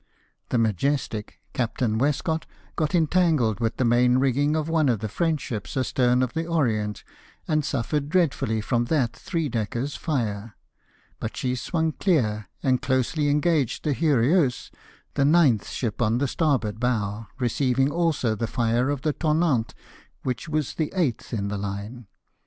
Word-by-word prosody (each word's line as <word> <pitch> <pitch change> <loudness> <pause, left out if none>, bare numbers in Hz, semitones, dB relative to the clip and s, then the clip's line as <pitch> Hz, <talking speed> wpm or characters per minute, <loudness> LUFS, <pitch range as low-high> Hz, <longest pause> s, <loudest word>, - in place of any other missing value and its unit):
The - - +1
Mcijestic, 110 - 0 0.2
Captam 115 -2 -1
Westcott, 160 +4 0 0.3
got 155 +2 0
entangled 160 - +2
with 115 -1 -1
the 130 - +1
main 125 +1 +4
rigging 140 +3 +2
of 155 -1 -1
one 160 -3 +2
of 120 - +2
the 110 +2 -4
French 160 - 0
ships 110 0 -5
astern 125 -1 +2
of 125 - -2
the 165 0 -2
Orient, 110 - 0 0.4
and 155 -1 +1
suffered 140 +2 -1
dreadfully 135 -10 +1
from 120 +2 0
that 125 -3 0
three 165 -4 -2
decker's 120 +3 -2
fire; 115 -8 -2 0.6
but 110 - -5
she 125 -1 -1
swung 160 +5 -1
clear, 110 - 0
and 130 -2 +2
closely 140 +3 +1
engaging 150 -3 +1
the 150 - +1
Heureux, 145 -1 +2 0.4
the 140 - +1
ninth 145 - +4
ship 115 -2 -3
on 115 0 +2
the 140 +2 +1
starboard 125 -8 0
bow, 110 -3 -1
received 130 +1 +1
also 150 -7 +1
the 115 +2 -2
fire 120 +3 +1
of 140 -2 -2
the 155 -2 +1
Tonnant, 155 -7 +1 0.5
which 125 +1 -3
was 155 -3 -1
the 155 -2 -2
eighth 155 -11 -1
in 100 -4 -2
the 100 0 -3
line. 100 +4 -6
130 Hz, 155 wpm, -25 LUFS, 115-155 Hz, 0.6 s, main